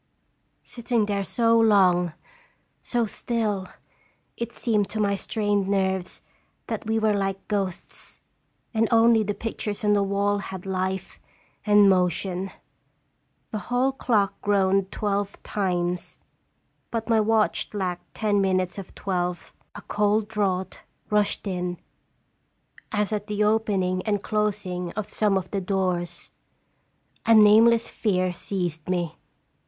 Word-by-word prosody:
Sitting 235 -2 -1
there 200 -1 -1
so 230 +2 +3
long, 185 -6 +4 0.7
so 240 -2 0
still, 210 -3 -2 0.7
it 235 0 -4
seemed 215 -4 0
to 220 - -4
my 200 -1 +2
strained 205 -1 0
nerves 190 -2 -1 0.4
that - - -4
we 220 0 +1
were 220 -1 +2
like 195 -1 -2
ghosts, 195 -4 -4 0.5
and 225 0 +2
only 230 -1 +5
the 205 -1 -2
pictures 215 -1 -4
on 210 - +4
the 205 - +3
wall 200 +1 +1
had 190 -2 -7
life 190 0 -3 0.5
and 205 -1 +7
motion. 185 0 +1 1.0
The 215 - -2
hall 250 +2 +2
clock 215 -7 0
groaned 195 -1 +2
twelve 200 -1 -2
times, 180 -3 -1 0.7
but 230 -1 -3
my 225 -2 +4
watch 215 -5 +1
lacked 185 -4 -4
ten 205 -2 +1
minutes 185 0 0
of 190 - -10
twelve. 180 -2 -3 0.2
A - - -9
cold 210 +1 +1
draught 195 -4 -1 0.3
rushed 210 0 +1
in 180 -2 -2 1.1
as 210 -1 0
at 210 0 -3
the 210 -1 0
opening 200 -4 +1
and 205 -2 0
closing 200 -5 -1
of 215 -1 -3
some 205 -3 +2
of 185 -1 -4
the 200 - -1
doors. 180 -2 -2 1.0
A 230 - +7
nameless 225 +2 +6
fear 185 -4 0
seized 175 -3 -3
me. 175 -3 -1
200 Hz, 125 wpm, -25 LUFS, 185-215 Hz, 1.1 s, and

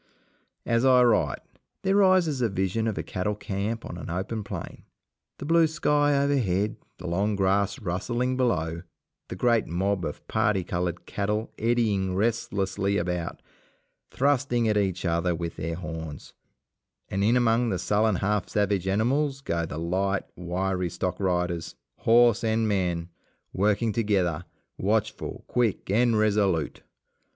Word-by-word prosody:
As 115 +1 +2
I 130 -1 +6
write, 105 - +2 0.4
there 195 +1 +2
rises 185 -8 +4
a 115 - +2
vision 95 +3 -1
of 110 - -2
a - - -2
cattle 105 +3 -2
camp 105 +3 -3
on 85 - -7
an - - -7
open 95 +5 -3
plain, - - -7 0.6
the - - -7
blue 165 +1 +4
sky 145 -2 +2
overhead, 110 -8 +1 0.2
the 90 - -10
long 100 +5 0
grass 100 +3 +1
rustling 120 +5 -1
below, 85 -10 0 0.5
the - - -6
great 115 +4 +2
mob 95 +2 -1
of 75 - -6
parti 100 -2 +1
coloured 90 0 -3
cattle 105 +2 -2
eddying 110 -5 +1
restlessly 100 -2 0
about, 90 -1 -3 0.7
thrusting 130 -4 +1
at 105 - +2
each 95 -3 0
other 85 +1 +1
with 85 0 -4
their 80 +1 -3
horns; 80 -3 -7 0.7
and 100 +1 -1
in 115 +4 +4
among 120 0 +2
the 95 - 0
sullen 105 +2 +1
half 100 +1 0
savage 100 -3 0
animals 135 +8 +1
go 85 -9 -2
the 75 - -6
light, 95 +4 0
wiry 90 +1 -2
stock 90 +1 -3
riders, 90 -3 -1 0.2
horse 120 0 +4
and 110 0 +1
man 90 -4 -1 0.4
working 105 +3 +1
together, 95 -7 0 0.3
watchful, - - -1
quick, 115 -6 0
and 115 +1 +3
resolute. 100 -7 +1
100 Hz, 140 wpm, -26 LUFS, 90-115 Hz, 0.7 s, I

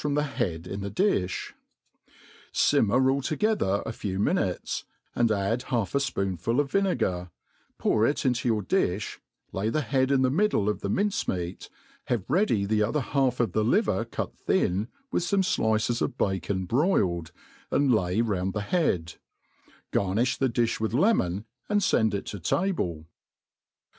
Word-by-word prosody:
from 145 -1 -1
the 150 - +2
head 95 - -2
in 95 +2 -5
the 100 - -3
difh; 100 - 0 1.0
iimmer 130 +5 +4
all 140 +1 0
together 155 - 0
a - - -3
kw 100 -3 -4
minutes, - - 0 0.3
and 115 -2 +2
add 105 +4 0
half 115 -6 0
a 140 - +3
fpoonful' 100 - -1
of 145 -2 0
vinegar^ 115 - 0 0.5
pour 110 +1 +2
it 145 - -1
into 125 -2 +2
yoiir 105 -4 -2
di(h, - - 0 0.3
lay 100 +3 -1
the 155 +6 0
head 130 -1 +1
in 135 -1 +3
the 130 - +3
middle 175 - +2
of 105 - -1
the 100 - -3
mince 200 - 0
meat, 90 0 -4 0.4
have 115 -6 -2
ready 145 - +2
the 105 +1 +1
other 130 +8 +1
half 130 -1 0
of 115 -6 +1
the 110 +4 +1
liver 125 - +2
cut 115 - -5
thin,^ 95 +5 0 0.2
with - - +1
fome 190 +3 +1 0.2
Hices 110 +2 +1
of 130 - -1
bacon 95 -1 -1
broiled, 95 - +1 0.4
and 140 -3 +3
lay 95 0 +1
round 95 -4 -1
the 105 - -2
headir 100 - 0 0.8
Garniih 105 +6 +1
the 135 - +2
diib 115 -1 0
with 110 +1 -1
lemon, 110 - +2 0.2
and 205 -1 +2
fend 110 - +2
it 100 - -4
to 100 - -6
table. 90 - -1
115 Hz, 165 wpm, -27 LUFS, 95-140 Hz, 1.0 s, iimmer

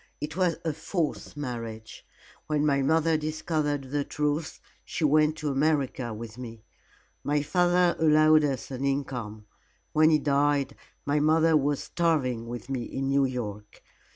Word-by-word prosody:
It 150 +1 -5
was 180 -3 +1
a 160 - 0
false 160 -1 -3
marriage. 115 -5 -6 0.4
When 150 -1 +1
my 140 -2 +2
mother 160 +3 +2
discovered 155 -3 -2
the 145 0 0
truth, 150 +2 -2 0.2
she - - -4
went 155 +1 +4
to 155 -2 -3
America 135 -4 0
with 110 +1 -8
me. 115 -3 -9 0.6
My 145 0 +1
father 175 +1 +2
allowed 155 0 +5
us 135 -2 -2
an 130 0 -4
income. 125 -6 -3 0.5
When 155 +1 +5
he 155 - +5
died, 145 -1 +1 0.3
my 145 +1 +1
mother 160 +2 +4
was 145 -1 +1
starving 130 -9 0
with 120 -1 -7
me 135 -2 -2
in 135 0 -3
New 140 0 +3
York. 105 -5 -6
145 Hz, 150 wpm, -27 LUFS, 130-155 Hz, 0.6 s, allowed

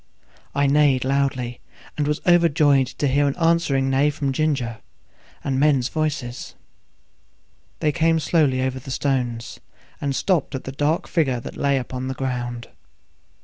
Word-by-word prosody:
I 140 0 +2
neighed 140 -2 +3
loudly, 130 -3 -1 0.4
and 145 -1 -1
was 150 0 -1
overjoyed 150 -6 +4
to 145 - -2
hear 145 +2 +2
an 140 - -1
answering 165 -6 +2
neigh 140 +2 +3
from 145 -2 -2
Ginger, 130 -6 -1 0.6
and 135 -1 -1
men's 140 -3 +3
voices. 140 -6 -3 1.3
They 150 - +2
came 165 +1 +2
slowly 145 -5 +2
over 130 0 -2
the 135 +2 -11
stones, 125 -4 -2 0.4
and 140 -1 -1
stopped 175 -6 0
at 130 - -5
the 135 - -6
dark 145 +4 0
figure 135 -7 +1
that - - -8
lay 140 -1 +1
upon 130 0 -4
the 130 - -3
ground. 120 -2 -4
140 Hz, 145 wpm, -22 LUFS, 130-150 Hz, 1.3 s, overjoyed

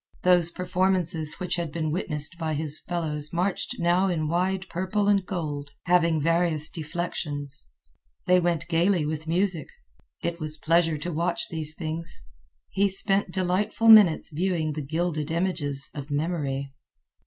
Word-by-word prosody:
Those 180 -2 +4
performances 180 -3 0
which 180 -2 -2
had 170 -3 -3
been 155 -1 -2
witnessed 155 -1 0
by 160 -2 -2
his 150 0 0
fellows 150 -4 -4
marched 180 +3 -2
now 175 +3 +2
in 160 -4 -1
wide 185 +3 -1
purple 190 +4 -1
and 200 -2 +3
gold, 150 -6 -4
having 170 -3 +3
various 165 0 +3
deflections. 150 -4 -4 0.6
They 180 0 +4
went 170 -1 -1
gayly 170 0 +2
with 155 +1 -4
music. 180 0 0 0.6
It 170 0 -3
was 155 -1 -2
pleasure 165 0 +2
to 170 +3 -5
watch 170 +3 0
these 155 -1 0
things. 165 +1 -6 0.5
He 200 +1 +2
spent 195 0 +3
delightful 190 +5 0
minutes 205 -8 +7
viewing 165 -2 -1
the 155 - -4
gilded 155 +1 -2
images 160 -6 -2
of 145 0 -7
memory. 145 -3 -2
170 Hz, 140 wpm, -26 LUFS, 155-180 Hz, 0.6 s, minutes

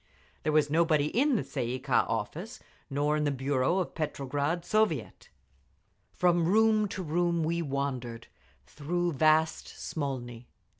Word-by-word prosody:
There 155 - 0
was 150 -1 +2
nobody 155 -1 +2
in 275 +3 +3
the - - 0
Tsay 120 - -3
ee - - -5
kah - - +2
office, - - -4 0.3
nor 145 +2 +1
in 150 - 0
the 145 - +2
bureau 135 +4 0
of 185 - 0
the - - -28
Petrograd 150 +2 -2
Soviet. 200 - 0 0.8
From 175 -2 +2
room 215 +2 +4
to 190 -1 -5
room 170 +1 0
we 170 +2 0
wandered, 135 -5 -3 0.4
through 175 +4 -2
vast 155 +2 +2
Smolny. 125 -5 -5
155 Hz, 145 wpm, -29 LUFS, 140-175 Hz, 0.8 s, room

